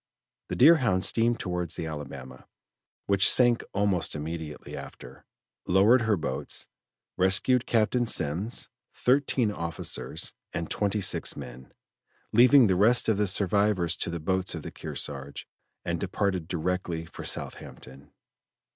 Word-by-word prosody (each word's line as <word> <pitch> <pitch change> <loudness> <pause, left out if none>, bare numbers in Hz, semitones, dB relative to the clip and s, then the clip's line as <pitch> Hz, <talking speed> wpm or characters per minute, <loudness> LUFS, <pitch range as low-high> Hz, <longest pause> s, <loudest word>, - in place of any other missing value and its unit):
The - - -4
Deerhound 125 - +4
steamed 115 +3 +1
towards 90 -3 -3
the 80 - -4
Alabama, 70 -4 -8 0.6
which 100 0 +5
sank 120 -2 +4
almost 100 -5 0
immediately 80 0 -6
after, - - -11 0.4
lowered 105 +7 +5
her 110 -3 +1
boats, 80 - -4 0.5
rescued 105 +7 +2
Captain 120 +1 +1
Semmes, 90 +6 0 0.3
thirteen 125 -3 +1
officers, 85 -5 -4 0.2
and 80 0 -4
twenty 105 0 0
six 95 - 0
men, 65 +1 -10 0.6
leaving 125 +3 +7
the 95 -3 +2
rest 115 +5 +3
of 110 - +2
the 105 0 +1
survivors 100 -2 +1
to - - -3
the 85 0 -4
boats 95 +3 -1
of 80 - -7
the - - -7
Kearsarge, 70 0 -6 0.4
and - - -2
departed 95 -5 -2
directly 85 -1 -3
for - - -10
Southampton. 65 +2 -6
95 Hz, 130 wpm, -27 LUFS, 80-110 Hz, 0.6 s, leaving